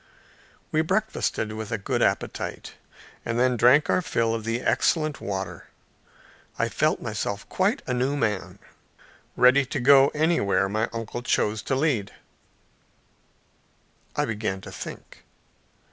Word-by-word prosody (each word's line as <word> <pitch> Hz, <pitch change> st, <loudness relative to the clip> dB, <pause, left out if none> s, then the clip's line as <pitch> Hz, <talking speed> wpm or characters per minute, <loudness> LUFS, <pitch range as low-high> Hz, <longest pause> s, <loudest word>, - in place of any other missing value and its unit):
We 155 Hz, -, +2 dB
breakfasted 185 Hz, -, -1 dB
with 110 Hz, -1 st, -6 dB
a 115 Hz, -, 0 dB
good 100 Hz, -, -2 dB
appetite, -, -, -2 dB, 0.5 s
and 115 Hz, +1 st, -2 dB
then 125 Hz, 0 st, +3 dB
drank 125 Hz, +6 st, +5 dB
our -, -, +2 dB
fill 115 Hz, -9 st, 0 dB
of 110 Hz, -1 st, -4 dB
the 115 Hz, +2 st, -1 dB
excellent 155 Hz, 0 st, +1 dB
water. 95 Hz, -1 st, -5 dB, 0.9 s
I -, -, 0 dB
felt -, -, 0 dB
myself 100 Hz, 0 st, -3 dB
quite 205 Hz, +8 st, 0 dB
a 125 Hz, -, -2 dB
new 130 Hz, +3 st, 0 dB
man, 105 Hz, -7 st, -2 dB, 0.8 s
ready 130 Hz, +3 st, +6 dB
to 140 Hz, -, -3 dB
go 135 Hz, +2 st, +7 dB
anywhere 150 Hz, -, +2 dB
my 110 Hz, +3 st, -1 dB
uncle 115 Hz, +1 st, -5 dB
chose 110 Hz, -2 st, 0 dB
to 135 Hz, -, -1 dB
lead. 130 Hz, -8 st, 0 dB, 2.0 s
I -, -, +1 dB
began 105 Hz, -3 st, -3 dB
to 95 Hz, -, -10 dB
think. 80 Hz, -, -9 dB
120 Hz, 130 wpm, -25 LUFS, 110-145 Hz, 2.0 s, go